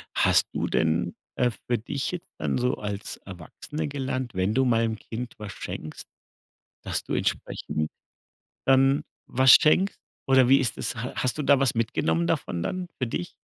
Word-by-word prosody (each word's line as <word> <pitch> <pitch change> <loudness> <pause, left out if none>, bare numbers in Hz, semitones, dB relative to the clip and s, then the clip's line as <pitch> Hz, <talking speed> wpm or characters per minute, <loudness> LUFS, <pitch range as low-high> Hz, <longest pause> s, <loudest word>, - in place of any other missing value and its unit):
Hast - - +4
du - - -1
denn, 80 +2 +1 0.2
äh, 125 -1 +2 0.2
für 120 - +2
dich 140 +7 -3
jetzt 180 -1 -7
dann - - -1
so 125 0 +1
als 105 -1 -5
Erwachsene 95 - -7
gelernt, 130 -3 -3
wenn 95 +3 +1
du 130 +2 +3
mal 115 -2 +3
'nem 110 - -3
Kind 120 +2 -6
was 105 -1 -7
schenkst, 80 - -7 0.8
dass - - -2
du - - -4
entsprechend 75 0 -2 0.8
dann 135 +1 +4 0.2
was 130 0 +5
schenkst 185 +6 +5 0.3
oder 130 -2 +5
wie 135 - +7
ist 130 -4 -1
das? - - -3
H 120 +2 -5
hast 130 +3 -1
du 150 - -1
da 140 -1 +5
was 135 -2 +2
mitgenommen 85 -7 +1
davon 85 - -1
dann 185 -1 -3
für 130 - 0
dich? 90 -6 -4
125 Hz, 175 wpm, -26 LUFS, 105-135 Hz, 0.8 s, wie